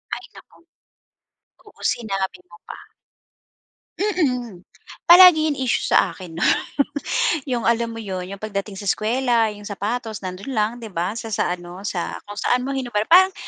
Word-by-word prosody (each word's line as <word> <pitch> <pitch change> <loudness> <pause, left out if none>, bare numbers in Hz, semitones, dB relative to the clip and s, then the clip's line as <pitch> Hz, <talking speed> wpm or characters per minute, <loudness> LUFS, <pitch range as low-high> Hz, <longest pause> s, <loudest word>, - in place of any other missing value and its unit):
Ay, - - -10
naku. - - -17 1.1
Oo, - - -19
sinabi 195 -6 -3
mo 170 - -15
pa. - - -9 1.2
Mm, 255 - -1 0.5
palagi 345 -3 +9
yung 290 - -2
issue 260 -3 0
sa - - +3
akin 170 -4 -10
'no. - - +1 1.0
'Yong 240 -2 -1
alam 235 0 +2
mo 225 - -8
'yon, 190 -5 -4
'yong 200 - -7
pagdating 200 -2 -4
sa 200 - -7
eskuwela, 230 +2 +1
'yong 205 0 -10
sapatos 215 +2 -4
nando'n 190 +8 -6
lang 215 0 +1
'di 225 -5 -10
ba, 180 +6 -2
sa 225 -2 -6
sa 180 -2 0
ano, 175 +2 -10
sa 185 -4 -4
kung 205 - -8
saan 245 +3 +1
mo 260 - -4
hinubad. 250 -6 -1
Parang 375 +2 +7
220 Hz, 160 wpm, -22 LUFS, 195-250 Hz, 1.2 s, palagi